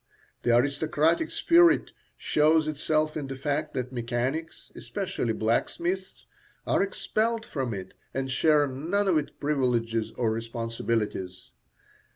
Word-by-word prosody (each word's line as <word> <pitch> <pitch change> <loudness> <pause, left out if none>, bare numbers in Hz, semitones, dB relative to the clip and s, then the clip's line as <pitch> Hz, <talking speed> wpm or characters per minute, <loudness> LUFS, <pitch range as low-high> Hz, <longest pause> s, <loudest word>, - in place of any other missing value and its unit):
The 120 0 +3
aristocratic 150 - +1
spirit 340 0 +4 0.3
shows 155 +1 +3
itself 155 +1 0
in 145 -3 -3
the 135 - -5
fact 145 +2 -2
that 125 0 -3
mechanics, 130 +7 -3
especially 185 - -3
blacksmiths, 170 - -1 0.4
are - - +2
expelled 225 +3 -1
from 130 -5 -3
it 95 -3 -6 0.2
and 135 0 -3
share 150 +2 +4
none 165 +10 -1
of 170 -5 +4
its 145 - -5
privileges 120 -6 0
or 115 -3 0
responsibilities. 115 -4 -3
140 Hz, 120 wpm, -27 LUFS, 120-160 Hz, 0.4 s, spirit